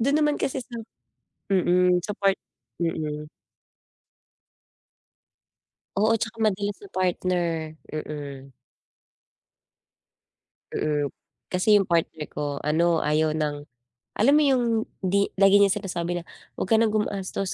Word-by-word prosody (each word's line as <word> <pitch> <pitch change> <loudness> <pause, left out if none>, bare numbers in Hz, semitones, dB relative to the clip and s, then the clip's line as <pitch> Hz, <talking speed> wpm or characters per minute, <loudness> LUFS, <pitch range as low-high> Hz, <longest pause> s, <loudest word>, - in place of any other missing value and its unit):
Dun 280 +5 +3
naman 295 -1 +2
kasi 265 0 -1
sa 240 - -9 0.8
mm, 180 -1 +4
sa 210 - -3
part 195 -1 +2 0.4
mm. 150 -3 -2 2.7
Oo, 215 +2 +3
tsaka 225 0 -4
madalas 205 -1 +1
sa 200 - -12
partner, 175 -3 -1
mm. 145 -3 -6 2.2
Mm, 150 -2 0 0.4
kasi 195 +4 +4
yung 200 - +4
partner 165 -3 0
ko 145 -1 -3
ano 165 +2 +2
ayaw 155 +1 +2
ng 145 -1 -2 0.5
alam 265 +7 +5
mo 300 0 +5
yung 260 -3 +3 0.4
di 200 +2 +2
lagi 195 +1 +6
niyang 200 -1 +5
sinasabi 175 -2 -2
na, - - -16 0.3
wag - - -3
ka 225 - +5
ng 225 -1 +3
gumastos 200 -2 -2
180 Hz, 115 wpm, -25 LUFS, 155-205 Hz, 2.7 s, lagi